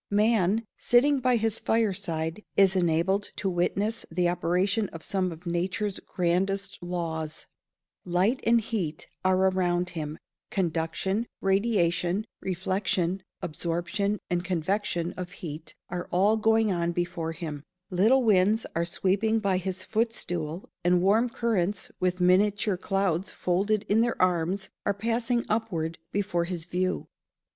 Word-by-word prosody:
Man, 210 0 +2
sitting 275 +4 +4
by 255 -1 +3
his 225 -1 +1
fire 225 -3 +2
side, 165 0 -3
is 195 -1 +6
enabled 180 +3 +1
to 205 - -2
witness 195 +5 0
the 175 +1 +1
operation 185 +5 +1
of 165 - -10
some 185 -2 0
of 165 +2 -10
nature's 185 +4 -1
grandest 190 +3 -1
laws: 165 -3 -3 0.6
light 185 +9 +1
and 235 0 +4
heat 190 -9 -3 0.2
are 185 0 +3
around 180 -2 +1
him; 155 -2 -5 0.3
conduction, 190 +4 -1
radiation, 195 -1 +1
reflection, 185 0 -1 0.2
absorption, 175 +6 -2
and 175 -1 -1
convection 180 0 -1
of 180 -1 -6
heat 155 -1 -8
are 175 0 -4
all 195 +5 +4
going 220 -1 +3
on 170 -1 0
before 175 -2 -2
him; 155 -4 -6 0.3
little 220 +9 +4
winds 210 +1 +3
are 170 +1 0
sweeping 195 +5 +1
by 200 -4 +1
his 185 0 -3
footstool, 180 -7 -2 0.2
and 175 0 +3
warm 220 +6 +4
currents, 210 -5 -1
with 180 0 0
miniature 200 +3 +3
clouds 190 -1 0
folded 200 +4 0
in 215 +3 +4
their 235 0 0
arms, 185 +2 +1
are 200 - 0
passing 235 +3 0
upward 175 -8 -1
before 190 -4 0
his 170 -2 -3
view. 185 +1 -1
185 Hz, 135 wpm, -27 LUFS, 175-210 Hz, 0.6 s, is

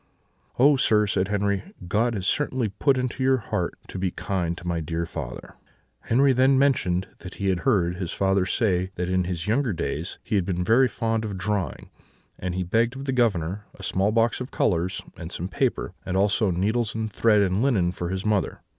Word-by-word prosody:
"'Oh, 140 +3 +6
sir!' 110 -5 +3
said 95 -2 0
Henri, 100 -1 0 0.3
'God 115 +5 +1
has 95 -3 -3
certainly 130 -1 0
put 130 +7 +1
it - - +1
into 130 +1 -3
your 130 0 +4
heart 110 - -3
to - - -6
be 95 0 0
kind 85 -2 -2
to 90 - -10
my 85 -1 -1
dear 80 +1 -2
father.' 80 -7 -7 0.5
"Henri 135 +3 +4
then 130 +2 +4
mentioned 95 -10 +2
that 90 - -9
he 100 -1 -1
had 90 -2 +1
heard 90 -9 +1
his 90 -3 -4
father 95 -1 +1
say 95 -3 +1
that 90 0 -2
in 90 -1 +1
his 85 -2 -3
younger 115 +1 +1
days 80 +2 -4
he - - -6
had 100 -3 +3
been 90 0 -1
very 120 +7 +4
fond 115 -1 -1
of 100 -3 -4
drawing; 95 -5 -3 0.5
and 90 -1 -3
he 95 - -1
begged 115 +7 +1
of 135 +1 -6
the 135 - -1
Governor 105 -5 0
a 95 - -12
small 95 +2 +1
box 115 +2 +1
of 125 - -5
colours, 90 +1 0
and 85 0 -7
some 90 - -4
paper; - - -1
and 95 0 -2
also 100 +2 +2
needles 110 +6 0
and 110 -1 -2
thread 105 -3 +4
and 95 +2 +1
linen 105 -10 +2
for 90 -1 -4
his 95 +1 -3
mother. 105 -2 0
100 Hz, 210 wpm, -25 LUFS, 90-115 Hz, 0.5 s, Oh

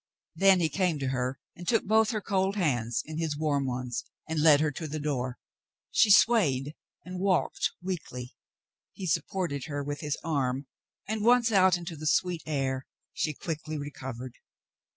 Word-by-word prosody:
Then 190 +1 +5
he 165 - +3
came 175 +1 0
to 135 -2 -2
her 130 0 -1 0.2
and 175 0 -10
took 225 - +2
both 220 +1 +4
her 215 -3 -1
cold 195 0 0
hands 120 - 0
in 155 +1 -5
his 160 -3 -1
warm 145 -3 0
ones 125 -1 -3 0.2
and 160 -1 -1
led 150 -2 +7
her 150 0 +1
to 160 +3 -5
the 155 +1 -4
door. 130 -4 -2 0.5
She 220 - +4
swayed 155 - +4 0.3
and 180 0 -6
walked 190 -2 +1
weakly. 140 -9 -5 0.6
He 190 - -6
supported 165 -2 -1
hfer 145 -2 -4
with 145 0 -4
his 150 -2 -2
arm 140 -4 -1 0.4
and, 215 0 -2
once 240 0 +5
out 190 -3 +5
in 175 - -8
the 155 -3 -4
sweet 175 +1 +1
air, 135 -3 -1 0.3
she 155 -2 -1
quickly 155 -2 -4
recovered. 130 -4 -6
155 Hz, 170 wpm, -29 LUFS, 135-185 Hz, 0.6 s, led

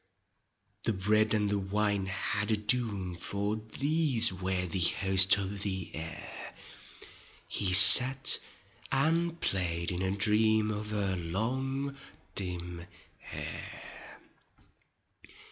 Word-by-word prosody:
The 115 - -2
bread 105 +3 0
and 105 -1 -2
the 100 - -2
wine 100 0 -3
had 100 +2 -5
a 110 - -1
doom. 105 -4 -3
For 100 +4 -5
these 130 - -1
were 95 0 -5
the 90 +1 -5
host 95 +2 +2
of 100 0 -7
the 95 -3 -6
air; 80 +1 -11 0.9
He 95 -2 -2
sat 130 +7 +9 0.5
and 165 +4 -2
played 85 -2 -3
in 90 0 -6
a 95 - -3
dream 110 +2 -1
Of 105 0 -8
her 100 -3 -4
long 130 +11 -6 0.4
dim 90 -2 -9 0.3
hair. - - -12
100 Hz, 110 wpm, -27 LUFS, 95-110 Hz, 0.9 s, sat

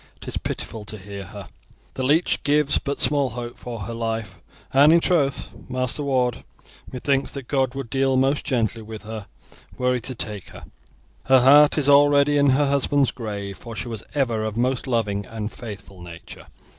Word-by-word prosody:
It - - -12
is - - -3
pitiful 110 -2 -5
to 110 +2 -6
hear 100 0 -8
her. - - -10 0.5
The - - -5
leech 150 +7 +2
gives 145 0 +3
but 140 -1 -4
small 140 -3 +2
hope 120 0 -6
for 120 -3 -7
her 115 - -5
life, 115 -1 -4 0.3
and 140 +3 +7
in 170 - +6
troth, 155 -6 +1 0.2
Master 130 +3 -1
Ward, 130 -4 0 0.5
methinks 135 +1 0
that 135 -3 -7
God 135 -2 0
would 135 -4 -6
deal 135 -1 +2
most 135 +2 +2
gently 115 -3 -1
with 110 -1 -9
her 110 -1 -7 0.5
were 125 0 +1
He 125 - 0
to 130 +2 -5
take 105 -4 -5
her. - - -12 0.6
Her 130 -1 +5
heart 145 +4 +7
is 145 -2 +2
already 145 0 +5
in 140 - +4
her 140 +3 +3
husband's 140 0 +2
grave, 100 -4 -6
for 115 -1 -8
she 120 - -5
was 115 -3 -6
ever 120 -6 0
of 110 0 -3
a - - 0
most 130 +2 0
loving 105 -5 -1
and 110 -1 -5
faithful 100 -5 -10
nature. 85 -1 -11
125 Hz, 190 wpm, -23 LUFS, 110-140 Hz, 0.6 s, and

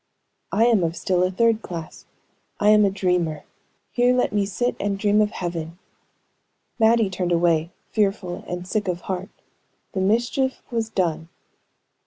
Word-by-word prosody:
"I 220 +3 +3
am 225 -6 +4
of 165 0 -1
still 180 -1 0
a 185 - +3
third 225 +3 +2
class 165 -5 -8 0.5
I 210 - +4
am 210 -1 +6
a - - +3
dreamer. 180 -5 -1 0.5
Here 245 +1 +3
let 250 - +1
me 205 -1 +1
sit 245 +5 -1
and 200 0 -1
dream 205 +1 +3
of 210 - +2
heaven." 170 -3 -5 1.0
Mattie 225 -1 +4
turned 180 -1 -2
away, 170 -1 +2 0.2
fearful 195 -4 -1
and 180 0 -5
sick 205 0 -1
of 175 -1 -2
heart; 190 +1 -4 0.6
the 190 - -1
mischief 240 +6 0
was 225 -2 -1
done. 170 -5 -1
195 Hz, 155 wpm, -23 LUFS, 175-220 Hz, 1.0 s, am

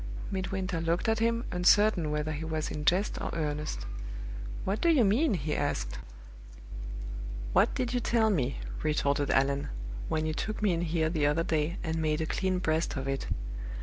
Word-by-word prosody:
Midwinter 190 -2 -2
looked 165 +5 0
at 220 0 +2
him, 230 +1 +1
uncertain 180 -1 +4
whether 150 +1 -1
he 155 +1 -4
was 160 -1 -2
in 150 0 -4
jest 185 +6 +2
or - - -2
earnest. 150 - -2 0.8
"What 195 +3 -1
do 340 - +4
you 280 -9 +5
mean?" 225 +5 +3
he 155 -2 -1
asked. - - -1 1.5
"What - - +4
did 250 -1 -1
you 250 - +2
tell 225 -2 +3
me," 140 -8 0 0.2
retorted 145 -2 +1
Allan, 140 +1 +2 0.4
"when 155 0 0
you 155 - 0
took 215 +7 -3
me 205 -4 +3
in 165 - 0
here 160 -1 +1
the 150 -4 +2
other 155 +3 +2
day, 160 +2 0
and 160 -2 -1
made 155 -1 +1
a 160 - 0
clean 185 +3 0
breast 160 -2 0
of 135 +1 -3
it? 135 0 -2
165 Hz, 180 wpm, -30 LUFS, 150-195 Hz, 1.5 s, you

